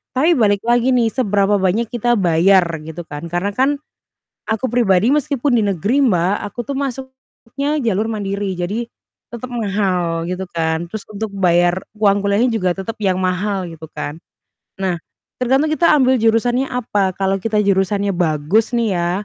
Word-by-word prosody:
Tapi 310 +7 +3
balik 205 -3 +2
lagi 240 +2 +2
nih 230 -2 +3
seberapa 205 -4 +1
banyak 205 +5 0
kita 240 0 +1
bayar 185 +1 +4 0.2
gitu 160 +2 -6
kan, 145 +1 -7
karena 175 +4 -2
kan 270 +5 +1 0.7
aku 220 +4 -1
pribadi 215 -4 +3
meskipun 285 -3 +1
di 220 - +2
negeri 200 - +1
Mbak, 185 -1 +2
aku 205 +4 -7
tuh 275 - -4
masuknya 265 +2 -4
jalur 220 -1 0
mandiri, 200 -2 -3
jadi 195 +7 -3 0.5
tetap 245 +2 -7
mahal 190 -7 -1
gitu 185 +1 -4
kan. 160 0 -1
Terus 210 +4 -7
untuk 210 0 -5
bayar 175 -1 +2 0.2
uang 200 -1 +3
kuliahnya 200 +4 +2
juga 185 -5 0
tetap 195 +4 -4
yang 185 -2 +1
mahal 185 +1 -1
gitu 160 -2 -10
kan. 150 +3 -6 0.6
Nah, 185 -3 -1 0.4
tergantung 270 +5 +2
kita 335 +1 +4
ambil 260 -3 +3
jurusannya 235 +3 +2
apa, 210 -7 -1
kalau 195 0 0
kita 210 +1 0
jurusannya 200 +1 +1
bagus 175 +7 +1
nih 225 -6 +1
ya, 175 0 0
205 Hz, 160 wpm, -18 LUFS, 185-240 Hz, 0.7 s, bayar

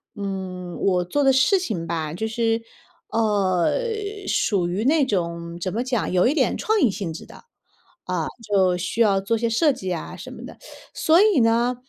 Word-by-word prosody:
嗯， 190 -3 -5
我 180 -2 +2
做 290 +10 0
的 270 - +5
事 265 +9 +4
情 200 - -3
吧， 160 -2 -3
就 220 +5 -2
是， 225 0 0 0.5
呃， 200 - +1 0.5
属 185 -5 +1
于 185 +5 -2
那 295 -1 +4
种 170 -5 -3
怎 185 +1 -3
么 235 - -1
讲， 250 -4 -1
有 180 0 +3
一 275 - +2
点 320 - +1
创 435 -1 +1
意 250 - +5
性 180 -5 -4
质 - - -9
的。 - - -14 0.6
啊， 180 -3 -2 0.2
就 190 -3 +2
需 185 +6 -2
要 200 -3 +4
做 225 +4 0
些 230 +1 0
设 285 +6 +3
计 190 -7 -4
啊 165 - -6
什 - - -9
么 - - -10
的。 - - -11 0.4
所 325 +3 +4
以 415 -9 +4
呢， 235 +2 +2
205 Hz, 200 characters per minute, -23 LUFS, 180-240 Hz, 0.6 s, 的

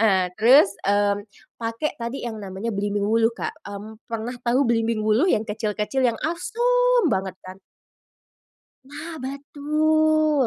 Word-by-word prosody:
eee, 190 -5 +3
terus, 225 -2 +6
mmm, 205 0 +2 0.4
pakai 230 +6 -2
tadi 235 +2 -4
yang 230 - -4
namanya 195 +4 -4
belimbing 205 0 -1
wuluh, 225 +1 +3
Kak. 235 - -5
Mmm, 215 +2 -9
pernah 230 +2 -3
tahu 250 +3 +2
belimbing 230 -1 +1
wuluh 235 - +3
yang 215 +1 +1
kecil 215 +1 -2
kecil 260 +5 0
yang 235 -3 +1
asem 485 +7 +2
banget 190 - -1
kan? 185 0 -9 1.3
Nah, 300 +4 -8
betul. 305 +1 +1
230 Hz, 140 wpm, -23 LUFS, 210-300 Hz, 1.3 s, terus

